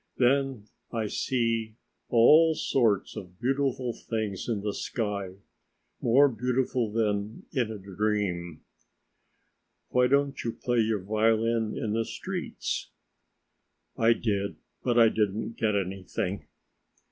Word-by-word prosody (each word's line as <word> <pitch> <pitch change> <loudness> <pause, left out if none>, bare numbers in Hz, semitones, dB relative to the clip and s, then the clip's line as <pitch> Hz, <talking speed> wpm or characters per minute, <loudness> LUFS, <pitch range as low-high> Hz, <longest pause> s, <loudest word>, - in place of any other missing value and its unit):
Then 135 -2 +2 0.3
I 115 -2 -1
see 115 -1 -1 0.3
all 155 +8 +6
sorts 115 -9 +1
of 90 -1 -9
beautiful 130 -1 0
things 110 -3 -4
in 110 -4 -1
the 105 0 -2
sky, 100 -6 -3 0.7
more 130 +5 +5
beautiful 125 -1 0
than 105 -1 -1
in 125 -6 0
a 110 - -5
dream." 95 -4 -2 1.3
"Why 125 0 +3
don't 140 0 +1
you 115 - -2
play 120 -1 -1
your 110 -3 +1
violin 110 +2 +1
in 105 -2 -2
the 115 +1 +1
streets?" - - -4 1.1
"I 115 +1 +4
did, 100 -4 -1 0.3
but 120 -1 +1
I 115 -1 +7
didn't 110 +1 -1
get 110 -2 +1
anything." 95 +1 -3
115 Hz, 115 wpm, -28 LUFS, 105-125 Hz, 1.3 s, I